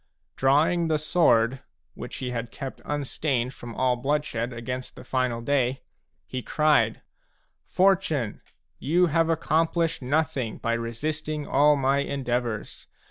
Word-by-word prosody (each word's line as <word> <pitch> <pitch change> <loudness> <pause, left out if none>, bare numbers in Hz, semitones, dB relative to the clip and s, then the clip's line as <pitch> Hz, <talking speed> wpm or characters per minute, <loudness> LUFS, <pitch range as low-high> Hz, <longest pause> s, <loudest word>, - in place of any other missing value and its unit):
Drawing 155 +6 +3
the 155 -1 +2
sword, 135 -6 +3 0.2
— - - -50
which - - -8
he 125 -1 -4
had 120 -1 -3
kept 135 +3 -7
unstained 140 -3 -1
from 120 -2 -9
all 130 -1 +2
bloodshed 130 -2 -1
against 125 +2 -5
the - - -11
final 125 -3 -1
day, 130 0 0 0.2
— - - -48
he 130 - -5
cried: 145 -7 +2 0.3
" - - -42 0.3
Fortune, 180 - +1 0.4
you 170 +7 +3
have 165 0 +2
accomplished 165 0 +1
nothing 140 -3 -1
by 115 - -1
resisting 150 +6 -3
all 145 +2 +4
my 135 0 +2
endeavours. 125 -5 -3
135 Hz, 135 wpm, -26 LUFS, 120-155 Hz, 0.4 s, all